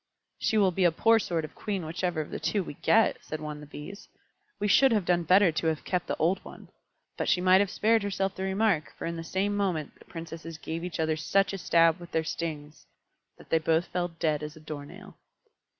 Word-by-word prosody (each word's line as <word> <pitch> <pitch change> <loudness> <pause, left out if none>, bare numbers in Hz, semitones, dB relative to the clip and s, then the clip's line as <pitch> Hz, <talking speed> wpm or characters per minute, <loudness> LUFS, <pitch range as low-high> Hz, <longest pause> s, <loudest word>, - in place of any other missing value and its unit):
"She 220 - +1
will 195 -3 +4
be 185 +2 0
a 175 - +5
poor 225 +7 +4
sort 170 -6 -2
of - - -12
Queen 195 -6 -4
whichever 170 0 -2
of 150 - -8
the - - -4
two 205 -3 0
we - - -7
get," 225 +9 +2
said 155 - -5
one 150 -1 -5
of - - -11
the 150 - -11
Bees. 150 +8 -10 0.5
"We 205 - 0
should 265 +6 +5
have 210 -5 +1
done 175 -1 +2
better 180 +2 +5
to 160 +1 -1
have 160 -1 -1
kept 180 -1 -2
the - - -1
old 180 +4 +1
one." - - -12 0.5
But - - -1
she 190 - +3
might 185 +1 +5
have 200 - 0
spared 225 +3 +2
herself 195 -1 -1
the 190 - -8
remark, 190 -4 +1
for - - -5
in 170 - -3
the 165 - -5
same 195 +4 -1
moment 180 -7 -1
the - - -17
Princesses 165 -1 -8
gave 165 +1 -5
each 180 -2 -5
other 160 -1 +1
such 195 +5 +1
a 195 - -4
stab 165 0 +4
with 175 0 -12
their 160 - +1
stings 155 -2 -5 0.5
that - - -17
they 165 - +4
both 160 +2 +1
fell 175 -1 -1
dead 160 -3 -1
as 150 0 -6
a - - -12
door 150 -2 -7
nail. - - -13
175 Hz, 240 wpm, -28 LUFS, 160-195 Hz, 0.5 s, a